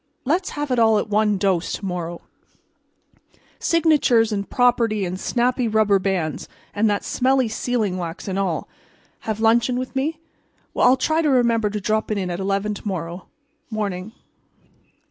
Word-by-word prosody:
Let's 345 +7 +1
have 295 -2 -2
it 245 - +1
all 220 -1 +5
at 210 - -2
one 210 -1 +2
dose 185 -3 0
to 200 - -5
morrow—signatures 225 - -2
and 200 -1 -3
property 235 -5 +2
and 180 +1 -4
snappy 245 +2 0
rubber 215 -2 +3
bands 185 -5 -2 0.2
and 215 +1 +2
that 205 -1 0
smelly 260 -1 +2
sealing 220 -4 -1
wax 170 0 -6
and 195 0 -2
all. 180 -5 -1 0.6
Have 220 0 -1
luncheon 235 +2 +3
with 255 +1 -5
me? 305 +4 -1 0.5
Well, - - +3
I'll 255 +1 +5
try 315 +5 +1
to 305 - +1
remember 235 -5 +2
to 210 +1 -3
drop 215 +2 -1
in 195 -4 -2
at 175 - -4
eleven 200 +2 -1
to 205 - -8
morrow. 175 -1 -5 0.4
Morning." 205 -3 -3
215 Hz, 155 wpm, -22 LUFS, 195-245 Hz, 0.6 s, all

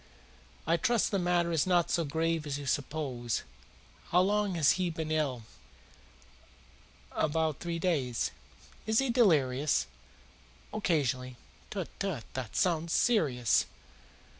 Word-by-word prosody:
"I 165 +2 +2
trust 235 +4 +1
the 200 - +1
matter 175 -1 +1
is 165 +1 +1
not 175 -2 +2
so 170 - +2
grave 160 +1 -1
as 140 -1 -2
you 145 - -7
suppose. 130 -4 -2 0.7
How 180 - +4
long 205 0 +1
has 155 -5 +4
he 185 -2 0
been 160 -1 -4
ill?" 140 -7 0 1.7
"About 155 -1 0
three 170 -1 -3
days." 145 -9 0 0.6
"Is 220 0 +2
he 270 -1 +3
delirious?" 150 - +3 0.9
"Occasionally." 130 - 0 0.3
"Tut, 190 -5 -4
tut! 185 - -2
This 130 -3 -3
sounds 170 -2 +1
serious. 135 - +2
160 Hz, 120 wpm, -30 LUFS, 140-180 Hz, 1.7 s, How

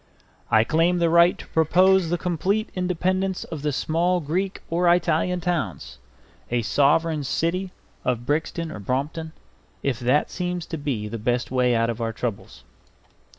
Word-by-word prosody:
I 110 0 +5
claim 165 +7 +2
the 170 -1 +2
right 170 +1 +5
to - - -10
propose 180 +3 +4
the 175 - +1
complete 190 +5 -1
independence 185 +1 -1
of 160 -4 -7
the 150 0 0
small 170 +6 +1
Greek 180 +5 -2
or 175 +1 +2
Italian 175 +1 +1
towns, 165 - -3 0.5
a 120 -1 0
sovereign 145 +7 +2
city 175 +7 -1 0.3
of 120 -1 -1
Brixton 160 +3 -1
or 105 - -7
Brompton, 145 +9 -3 0.5
if 130 -4 -1
that 130 +4 +1
seems 180 -2 -3
the 115 -9 -4
best 120 +1 0
way 125 -2 +2
out 115 0 +2
of 115 +1 -7
our 115 -1 -2
troubles. 100 - -5
160 Hz, 150 wpm, -24 LUFS, 125-180 Hz, 0.5 s, I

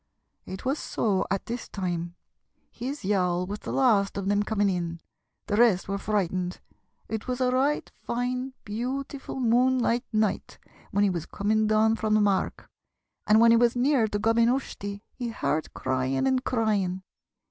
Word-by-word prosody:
It 190 +5 -7
was 275 +4 0
so 195 -4 0
at 195 - -1
this 240 0 -5
time 175 -3 -3 0.6
his 260 0 -5
yawl 180 -3 +1
was 205 +3 -5
the - - -6
last 215 -8 +2
of 195 -1 -3
them 205 0 +2
coming 205 -1 +1
in; 170 -3 -2 0.5
the 205 - -1
rest 225 -6 +4
were 200 +1 -2
frightened. 185 -3 -1 0.5
It 220 +1 -4
was 250 0 -2
a 250 -1 +2
right 275 +4 +1
fine, 250 +2 -2
beautiful 265 +6 -4
moonlight 245 0 +2
night 215 -2 -1 0.3
when 200 +1 +1
he 200 - +3
was 170 -2 -4
coming 215 +1 +1
down 220 +1 +3
from 215 -1 +1
the - - +4
mark, 200 -2 0 0.6
and 215 +1 +6
when 230 0 +7
he 230 - +6
was 240 0 +3
near 250 -2 +3
to 205 - -2
Gob 225 +2 +2
yn 230 0 +5
Ushtey 205 -6 -3
he 245 -2 -4
heard 155 -7 -2
crying 130 - 0
and 260 -1 +1
crying. 200 -6 0
215 Hz, 170 wpm, -27 LUFS, 195-245 Hz, 0.6 s, when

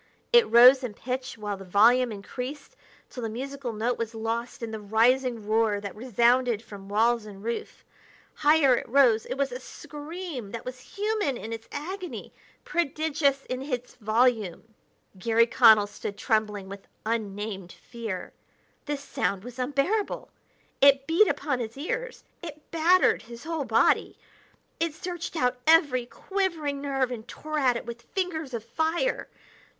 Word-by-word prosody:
It 475 -1 +6
rose 250 +4 +8
in 225 -5 -4
pitch 255 +2 -4
while 205 -2 -4
the 195 - -10
volume 230 +6 +4
increased, 250 +7 -7 0.3
till 250 - -8
the 225 - -2
musical 265 +2 -5
note 230 +3 -1
was 230 0 -3
lost 230 +2 -3
in 225 - -4
the 220 - -5
rising 230 +2 +2
roar 215 -1 +2
that 200 -1 -7
resounded 240 0 +2
from 200 -3 -11
walls 225 +1 +2
and 200 -1 -11
roof. 235 +1 -5 0.5
Higher 295 -3 +5
it - - -5
rose; 240 -4 +4
it - - -3
was 275 -1 -1
a 250 - -5
scream 300 - -7
that 230 - -6
was 255 0 -6 0.2
human 415 - 0
in 225 0 -6
its 225 0 -8
agony, 360 +5 -6 0.3
prodigious 295 -3 0
in 255 0 -4
its 250 -3 -4
volume! 220 -2 +1 0.5
Garry 230 +4 +4
Connell 225 -3 +6
stood 205 0 -7
trembling 210 -2 0
with 200 0 -10 0.2
unnamed 205 -4 -3
fear. 225 -6 -7 0.5
This 290 -1 -3
sound 195 -6 -2
was 245 +1 -10
unbearable; 285 - -1 0.5
it 275 0 +6
beat 335 +7 +4
upon 270 -5 -1
his 230 +1 -5
ears; - - -4 0.2
it 305 -3 -10
battered 340 +3 +4
his 235 0 -11
whole 320 -3 -3
body; 225 -2 +2 0.6
it 330 -2 -1
searched 350 0 -5
out 250 -4 +1
every 285 -7 +4
quivering 325 -6 -2
nerve 270 -3 0
and 225 -2 -6
tore 310 0 -4
at 250 -4 +3
it - - -7
with 235 0 -7
fingers 320 -6 -3
of 225 - -5
fire. 320 - -1
250 Hz, 155 wpm, -27 LUFS, 225-290 Hz, 0.6 s, rose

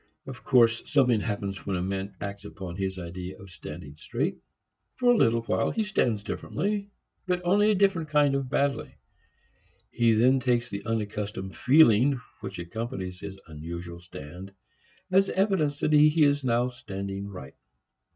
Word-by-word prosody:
Of 135 -2 -9
course 115 -3 +4
something 125 -6 +4
happens 100 -3 -3
when 95 - 0
a 90 - -1
man 95 +1 -3
acts 100 0 -6
upon 95 -4 -7
his 95 0 -3
idea 90 +1 -7
of 100 -1 -12
standing 75 -3 -9
straight. - - -2 0.6
For 245 -1 +4
a - - +3
little 115 - +3
while, - - +1
he 225 - 0
stands 120 - 0
differently, 200 - -3 0.4
but 180 -1 +1
only 205 +4 +4
a 215 - +4
different 190 -5 +2
kind 145 -2 +3
of 135 -2 -1
badly. 140 +1 0 1.0
He 115 -1 +3
then 125 +5 +4
takes 120 -3 0
the 100 0 -5
unaccustomed 105 -3 -3
feeling 130 -2 +5 0.2
which 100 -2 -7
accompanies 90 0 -5
his 95 0 -8
unusual 85 +2 -7
stand 90 +3 -10 0.6
as 195 +1 +4
evidence 185 -8 +1
that 155 - +2
he 150 +1 +6
is 145 -1 +3
now 120 0 +2
standing 100 -4 -6
right. 80 -10 -9
115 Hz, 155 wpm, -27 LUFS, 95-145 Hz, 1.0 s, he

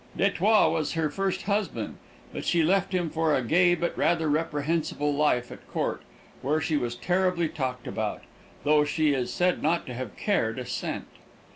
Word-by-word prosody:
D'Etioles 200 +2 +3
was 160 -3 -1
her 160 -3 0
first 195 +2 -1
husband, 205 +1 -2 0.4
but - - -5
she 170 -2 +2
left 195 +3 +2
him 175 -4 0
for 160 -1 +2
a 130 - 0
gay 175 +7 +4
but 170 0 -2
rather 165 -2 +2
reprehensible 150 -1 0
life 140 -4 +1
at - - -12
court, - - -2 0.4
where 150 +4 +1
she 160 - -1
was 120 -4 -1
terribly 180 +4 +1
talked 125 -4 -4
about, - - -3 0.4
though 150 +1 +4
she 150 0 +1
is 125 -2 -1
said 180 +6 +1
not 165 +3 +1
to 125 - -6
have 125 -4 -6
cared - - 0
a - - -4
cent. - - -4
160 Hz, 175 wpm, -27 LUFS, 145-175 Hz, 0.4 s, gay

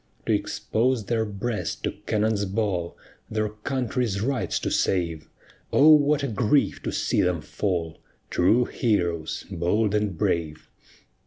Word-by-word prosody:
To - - +2
expose 120 -1 0
their 110 +1 0
breast 105 +2 -4
to - - 0 0.2
cannon's 105 -1 +1
ball, 95 -4 -2 0.3
Their 110 0 -1
country's 120 -1 -2
rights 125 +5 -1
to - - -2
save, 85 -5 0 0.4
O 150 +3 +6
what 150 -1 +5
a - - +1
grief 120 +5 +1
to - - -3
see - - +1
them 90 -2 +1
fall! 85 -1 -3 0.3
True 110 +8 +3
heroes, 85 -8 -1
bold 100 +5 +1
and 105 -4 0
brave! 80 -1 -2
105 Hz, 135 wpm, -25 LUFS, 90-120 Hz, 0.4 s, O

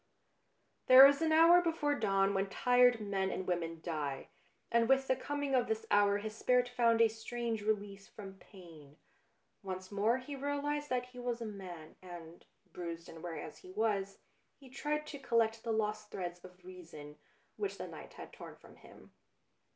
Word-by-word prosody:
There 260 +1 +11
is 280 +2 +4
an 320 -1 +1
hour 335 +3 +7
before 320 -4 0
dawn 195 -6 +1
when 195 0 -1
tired 245 +2 +4
men 195 -2 -1
and 185 - -4
women 165 -2 -3
die, 150 -5 -4 0.4
and 235 0 +2
with 270 0 +4
the 260 - +2
coming 285 0 -3
of 250 -2 +2
this 220 0 -2
hour 205 0 +4
his 215 +1 -6
spirit 250 +2 +2
found 235 -2 +2
a 230 - +7
strange 225 0 -4
release 205 -2 -3
from 195 -2 -11
pain. 165 -7 -15 0.6
Once 185 -1 -7
more 210 +4 +2
he 260 +2 -7
realised 285 +1 -2
that 250 -1 -1
he 250 0 -12
was 245 -1 -3
a 230 - -5
man, 185 -7 -9
and, 175 -2 -11 0.3
bruised 170 -1 -7
and 165 - -11
weary 165 -3 -6
as 155 - -10
he 185 - -14
was, 200 -1 -1 0.4
he 265 -3 -16
tried 300 +2 -2
to 285 - -8
collect 230 -3 +1
the 230 - -2
lost 215 -1 -2
threads 175 -2 -6
of 180 0 -15
reason, 165 -5 -11 0.4
which 405 -2 -3
the - - -6
night - - -11
had - - -11
torn - - -10
from - - -18
him. - - -17
215 Hz, 180 wpm, -33 LUFS, 185-250 Hz, 0.6 s, There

